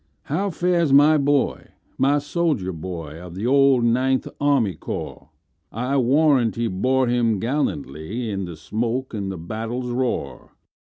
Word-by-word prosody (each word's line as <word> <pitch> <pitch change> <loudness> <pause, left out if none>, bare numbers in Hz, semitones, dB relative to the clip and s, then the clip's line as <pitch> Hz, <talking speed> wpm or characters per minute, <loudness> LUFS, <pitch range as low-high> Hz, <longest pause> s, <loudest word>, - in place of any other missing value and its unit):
"How 190 +8 -1
fares 175 -3 +1
my 150 +3 +6
boy,—my 140 0 0
soldier 145 - -1
boy, 80 -2 -7
Of 90 -1 -10
the 100 +4 -4
old 135 -1 +4
Ninth 130 +3 +1
Army 140 -9 +2
Corps?I 80 - -6
warrant 135 -2 +3
he 115 - -1
bore 130 +7 +1
him 120 -3 +1
gallantlyIn 100 - -3
the 85 -2 -8
smoke 115 - -3
and 100 -3 -3
the 95 - -6
battle's 115 +8 -4
roar!" 125 0 -3
120 Hz, 125 wpm, -22 LUFS, 95-140 Hz, -, my